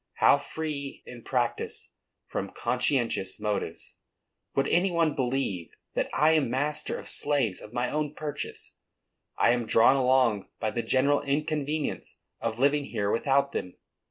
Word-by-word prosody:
How - - +5
free 150 -3 -5
in 120 -1 -10
practice 120 0 -2 0.3
from - - -4
conscientious 120 -7 0
motives! 105 -1 -3 0.6
Would 135 0 +2
any 180 +3 +3
one 165 -3 +2
believe 125 -10 -2 0.2
that - - -1
I 155 +1 +4
am 155 -6 +3
master 145 +4 0
of - - -9
slaves 135 -10 +2
of 105 - -11
my 120 +1 -1
own 150 -1 -2
purchase? 145 -1 -6 0.6
I - - +4
am 120 -2 0
drawn 115 +5 +5
along 130 -5 +3
by 110 -1 -1
the 120 - -1
general 140 +4 +2
inconvenience 150 +1 -2 0.2
of 115 -1 -2
living 140 +2 +2
here 105 -5 -1
without 140 +3 +2
them. 90 -8 -4
135 Hz, 145 wpm, -28 LUFS, 115-145 Hz, 0.6 s, How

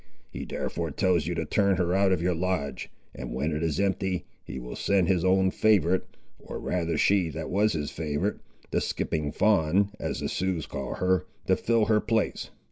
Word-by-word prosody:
He - - -6
therefore 85 -1 -3
tells 85 0 +1
you 90 - -1
to 85 -1 -2
turn 100 +4 +2
her 90 -1 0
out 95 0 +3
of 90 -3 +1
your 90 0 +2
lodge, 85 -4 -2 0.2
and 60 -1 -6
when 75 +5 -1
it 75 - -2
is 80 -3 -1
empty, 95 -2 0 0.2
he 65 - -7
will - - -6
send 95 -3 +2
his 90 -2 +2
own 95 0 +3
favourite, 95 -4 +3 0.4
or - - -7
rather 85 -3 -1
she 95 -2 +3
that 75 - -5
was 105 +3 +3
his 75 -3 -3
favourite, 80 +6 -2 0.3
the - - +1
'Skipping 75 -2 -2
Fawn,' 100 0 +3
as - - -3
the - - -1
Siouxes 90 -4 -1
call - - -4
her, 90 0 +1 0.2
to 95 - +3
fill 115 +1 +2
her 105 0 +3
place. 110 -1 -1
90 Hz, 195 wpm, -27 LUFS, 80-95 Hz, 0.4 s, out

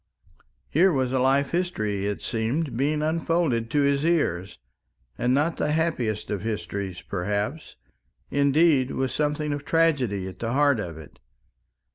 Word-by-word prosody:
Here 185 +5 +4
was 130 -4 0
a 130 - +1
life 135 +2 +2
history, 110 - -1
it 105 - -4
seemed, 120 +6 -1
being 150 +4 0
unfolded 160 -7 0
to 145 +4 +2
his 140 0 +2
ears, 100 - 0 0.6
and 125 - 0
not 150 +5 +1
the 150 - 0
happiest 130 -12 -1
of 100 -3 -2
histories, 100 -3 -4
perhaps, 105 - -3 0.6
indeed, 140 -1 +3
with 130 -2 -2
something 150 +1 -1
of 145 -1 -5
tragedy 140 - +1
at 95 -1 -9
the 115 0 -2
heart 140 -3 +3
of 85 -6 -5
it. 75 -3 -13
135 Hz, 145 wpm, -25 LUFS, 105-150 Hz, 0.6 s, Here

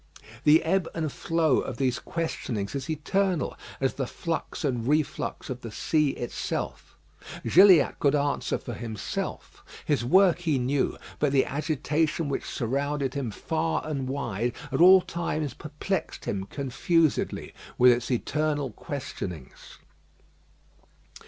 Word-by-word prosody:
The 155 +2 +6
ebb 175 +1 +1
and 160 -3 -1
flow 165 -4 +1
of 130 - -4
these 130 -2 0
questionings 120 -11 -3
is 140 0 -4
eternal, 180 +3 0 0.2
as 135 -1 +1
the 135 -3 -3
flux 165 +1 -4
and 120 -4 -1
reflux 150 +1 -1
of 125 -1 -5
the 115 - -6
sea 150 +7 +1
itself. 120 - -4 0.5
Gilliatt 185 -4 +6
could 145 0 +3
answer 145 0 0
for 120 - -7
himself; 110 -2 -5 0.2
his 145 -6 +1
work 180 +6 +5
he 160 -5 +1
knew, 130 +2 0 0.2
but 145 -2 +2
the 135 -1 +3
agitation 155 +2 -1
which 140 - -2
surrounded 140 +2 -1
him 140 -4 -2
far 160 +8 -2
and 140 -4 -3
wide 120 -4 -2 0.2
at 135 +4 +1
all 185 +1 +9
times 155 -6 -3
perplexed 155 +4 -4
him 95 -1 -2
confusedly 145 - 0 0.2
with 125 0 +7
its 120 0 0
eternal 145 +2 0
questionings. 95 - -7
145 Hz, 130 wpm, -27 LUFS, 125-160 Hz, 0.5 s, all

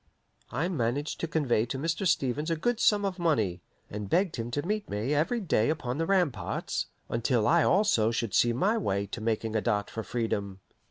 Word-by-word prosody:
I 145 +8 0
managed 145 -3 -2
to 165 - -2
convey 135 -8 +1
to 135 - -3
Mr. 165 +6 -1
Stevens 145 +2 0
a 165 - +1
good 235 +9 -1
sum 205 -3 +3
of 190 -2 -3
money, 110 - +1 0.3
and 105 -1 -6
begged 180 - +1
him 115 0 -3
to 145 +5 -2
meet 210 +2 -2
me 105 +8 -1
every 160 +12 +1
day 150 - +1
upon 145 -4 -2
the 165 - 0
ramparts, 155 - 0 0.2
until 115 -1 +1
I 170 0 +5
also 175 - +3
should 115 -3 -2
see 120 - +4
my 200 - +1
way 100 - -1
to 105 +3 -7
making 110 0 -1
a 110 - +2
dart 105 -1 -1
for 115 - -4
freedom. 100 -3 -3
130 Hz, 200 wpm, -28 LUFS, 110-170 Hz, 0.3 s, I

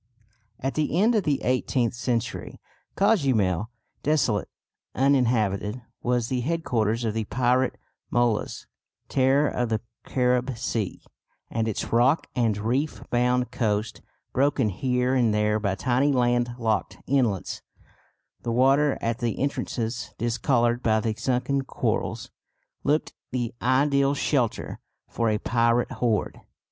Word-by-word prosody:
At 135 +1 -2
the 155 +2 0
end 225 +4 +4
of 210 -6 +1
the 145 -2 0
eighteenth 125 -1 +1
century 120 -1 -3 0.4
Cozumel, 120 - +2 0.3
desolate, 135 -9 +1 0.5
uninhabited, 120 -5 +2 0.2
was 120 -1 0
the 125 0 -1
headquarters 120 -7 0
of 110 - 0
the 110 -1 -2
pirate 125 +3 +1 0.3
Molas, 120 -3 0 0.4
terror 135 +3 +3
of 120 -2 -1
the 110 -1 0 0.2
Carib 125 -1 0
Sea; 110 -3 -3 0.5
and 115 0 0
its 110 - -3
rock 125 +7 +4
and 115 -4 +1
reef 125 +9 -1
bound 125 +1 +1
coast, 105 -2 -1 0.3
broken 135 -3 +2
here 125 +5 0
and 120 -5 +2
there 105 0 +2
by 100 -2 -1
tiny 130 +6 +2
land 120 -2 +1
locked 110 -3 -1
inlets, 120 -8 0 0.8
the 120 - -3
water 135 +4 +3
at 115 +1 -1
the 120 -3 -1
entrances 120 -4 -3
discoloured 120 +1 +1
by 110 -2 +2
the 110 0 -1
sunken 130 +4 0
corals, - - -2 0.5
looked 150 +2 +1 0.2
the 120 -2 -2
ideal 140 +2 +3
shelter 130 -5 -1 0.3
for 115 -1 0
a 105 - +1
pirate 115 +2 +1
horde. 115 -4 -1
120 Hz, 125 wpm, -25 LUFS, 115-135 Hz, 0.8 s, end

